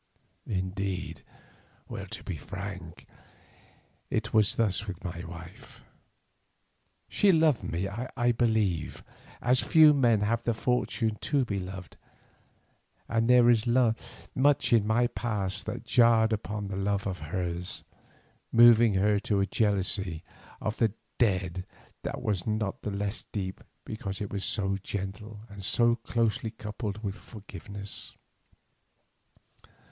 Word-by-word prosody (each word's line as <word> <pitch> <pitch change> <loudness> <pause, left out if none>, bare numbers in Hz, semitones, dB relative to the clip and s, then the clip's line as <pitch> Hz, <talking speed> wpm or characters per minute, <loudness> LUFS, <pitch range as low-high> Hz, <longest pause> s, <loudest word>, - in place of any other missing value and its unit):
Indeed, 95 -3 -3 0.9
to - - -7
be 95 - -4
frank, 90 +1 -8 1.0
it 110 0 -2
was 110 -2 +4
thus 105 -2 +1
with 95 -3 -6
my 85 -2 -5
wife: 85 +1 -11 1.3
She 205 - +4
loved 160 -6 +3
me, 85 +4 -2
I 120 +3 -1
believe, 110 -8 0 0.4
as 125 +1 +4
few 155 -2 +7
men 120 -7 +3
have 115 +3 +1
the 115 -1 -1
fortune 115 -2 0
to 140 -3 +1
be 100 -4 -2
loved, 95 -1 -8 1.1
and 115 +1 +1
there 125 -1 +7
is 120 -1 +4 0.7
much 140 -1 +3
in 110 -3 +4
my 120 +3 +3
past 105 -5 -2
that 125 - -5
jarred 115 -3 +4
upon 105 -1 -3
this 95 -1 -3
love 100 0 0
of 95 -2 -3
hers, 90 +2 -4 0.7
moving 115 -2 +7
her 100 +2 +3
to 100 -1 0
a 100 - +3
jealousy 95 -5 0 0.4
of 110 - -3
the 110 -4 +2 0.3
dead 95 -5 +1 0.4
that - - -5
was 100 -3 -1
not 105 -2 -1
the - - -3
less 100 +1 -3
deep 95 -3 -4 0.2
because 100 -2 -5
it 100 -2 -5
was 100 -1 -2
so 95 -1 +1
gentle 100 +2 -6
and 100 -3 -10
so 120 +4 +4
closely 115 -1 -1
coupled 105 -1 -6
with 100 -2 -2
forgiveness. 100 -1 -8
105 Hz, 125 wpm, -29 LUFS, 95-115 Hz, 1.3 s, few